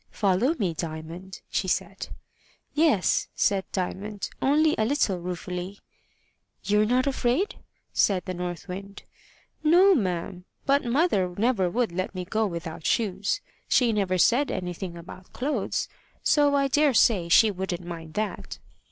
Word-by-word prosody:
"Follow 210 - +1
me, 185 - 0
Diamond," 165 +3 -7
she 190 - -1
said. 190 +1 -2 0.7
"Yes," 295 - +2
said 195 -2 +1
Diamond, 200 +2 -4
only 305 +3 +3
a - - +3
little 220 - +1
ruefully. 180 +2 -5 0.9
"You're 210 +2 +2
not 250 +2 +2
afraid?" 275 - 0 0.3
said 185 -4 +2
the 185 - -3
North 175 0 -5
Wind. 195 +2 -8 0.6
"No, 360 +5 +6
ma'am; 180 - -2 0.2
but 280 +1 +3
mother 235 - +1
never 210 -4 +2
would 235 +1 0
let 185 +2 -3
me 180 -1 -4
go 215 +3 0
without 170 -3 -6
shoes: 205 - 0 0.3
she 240 -3 +3
never 195 -3 +1
said 245 +10 +3
anything 180 -1 -4
about 180 +2 -12
clothes, 280 +4 -1 0.4
so 290 -1 +4
I 275 -1 +3
dare 290 0 +3
say 190 -7 +4
she 215 +5 +6
wouldn't 185 -2 -4
mind 165 -2 -8
that." 215 0 -3
195 Hz, 140 wpm, -26 LUFS, 180-250 Hz, 0.9 s, No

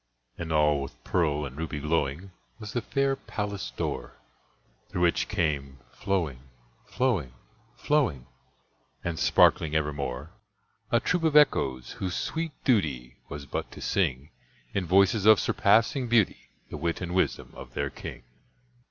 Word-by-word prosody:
And 80 -1 -5
all 75 -2 +3
with 70 - -7
pearl 75 -4 +1
and 65 -2 -8
ruby 80 -1 -4
glowing 80 +4 -1 0.3
Was 105 -3 -8
the 120 - 0
fair 135 +3 0
palace 100 - -4
door, - - -4 0.7
Through 90 - -1
which 85 - +2
came 70 -4 -1
flowing, 85 -10 -2 0.5
flowing, 95 - 0 0.4
flowing, 130 - +1 0.8
And 85 -3 -3
sparkling 80 -1 +4
evermore, 75 -1 -2 0.6
A 120 - +3
troop 180 +5 0
of 160 -2 +2
Echoes, 65 - +3
whose 90 -2 -2
sweet 160 -1 -3
duty 70 - 0
Was 75 -1 -7
but - - -4
to - - -10
sing, 75 -7 -1 0.4
In 95 -3 -1
voices 100 +4 +4
of 110 -2 +8
surpassing 115 +5 +3
beauty, 115 -4 +2 0.2
The - - -4
wit 85 0 -1
and 90 -1 -4
wisdom 95 - 0
of - - -11
their - - -1
king. - - -8
85 Hz, 140 wpm, -27 LUFS, 70-105 Hz, 0.8 s, of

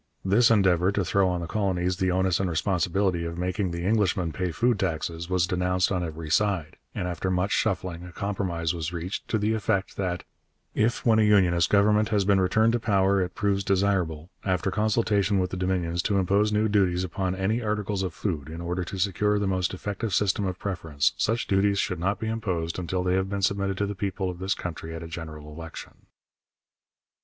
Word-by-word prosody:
This 110 +5 +5
endeavour 95 -4 +4
to 100 -2 0
throw 95 0 +2
on 90 -1 -1
the - - -3
colonies 90 -1 -1
the 95 -1 +1
onus 95 -1 +1
and 95 -2 0
responsibility 90 +2 0
of 85 0 -5
making 90 +2 -1
the 85 0 -4
Englishman 95 -5 +1
pay 90 +1 -2
food 115 +7 +1
taxes 85 -1 -2
was 90 -2 +2
denounced 90 +1 0
on 90 -2 0
every 80 -1 -6
side, 90 -5 +1 0.2
and 90 - -2
after 90 +1 -2
much 95 +2 0
shuffling 90 -5 -1
a 90 - -9
compromise 90 -4 -2
was 85 -1 -3
reached 90 +2 -5
to 110 - 0
the 105 +1 +1
effect 100 -3 -1
that 90 -2 -2 0.5
'if 115 +3 0
when 110 -2 +5
a - - +5
Unionist 95 -5 +4
Government 105 +1 +3
has 105 -3 +1
been 100 -1 +4
returned 110 +5 +3
to 120 - +1
power 100 -3 +2
it 90 0 -3
proves 100 -1 0
desirable, 95 -4 0
after 95 0 0
consultation 105 0 +1
with 90 -1 0
the - - -3
Dominions, 90 -2 0
to 100 +1 0
impose 100 +3 +2
new 105 +1 +2
duties 95 -4 +2
upon 95 +1 -2
any 100 +5 0
articles 105 -2 -1
of 95 -2 -2
food, 80 -5 -3
in 80 +1 -7
order 90 +1 -2
to 95 +3 -6
secure 105 +2 +1
the 105 - 0
most 95 -2 0
effective 100 +2 -3
system 100 0 +1
of 90 -1 -3
preference, 80 -8 -1
such 115 +2 0
duties 100 0 +2
should 90 -3 -1
not 100 +3 0
be 110 - -3
imposed 95 -7 -2
until 90 +1 -2
they 90 0 +1
have 95 +1 0
been 100 -1 -3
submitted 100 0 0
to 100 - 0
the 100 - -3
people 95 -1 -2
of 90 - -11
this 95 +1 0
country 80 -1 -6
at 80 - -6
a - - -7
general 80 -2 -8
election.' 80 0 -10
95 Hz, 205 wpm, -26 LUFS, 90-100 Hz, 0.5 s, This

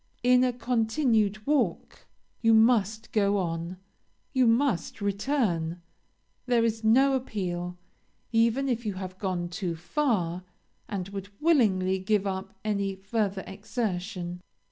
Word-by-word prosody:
In 250 0 +5
a 255 - +3
continued 225 -3 +1
walk 255 - -1 0.3
you 225 -1 +5
must 220 -1 +3
go 205 -1 +2
on 170 0 -3 0.6
you 260 -3 +4
must 230 - +1
return; 200 - 0 0.7
there 240 -2 +3
is 225 0 -1
no 265 +5 +5
appeal, 180 -8 -3 0.5
even 230 +4 +2
if 240 -2 -1
you 210 -3 -3
have 185 0 -7
gone 185 -4 -2
too 175 -1 -3
far, 180 - -1 0.5
and 195 -2 -4
would 200 0 -6
willingly 195 - +3
give 205 +1 +1
up 190 -1 -4
any 200 -2 0
further 195 0 -2
exertion. 190 -3 -4
205 Hz, 120 wpm, -28 LUFS, 185-235 Hz, 0.7 s, In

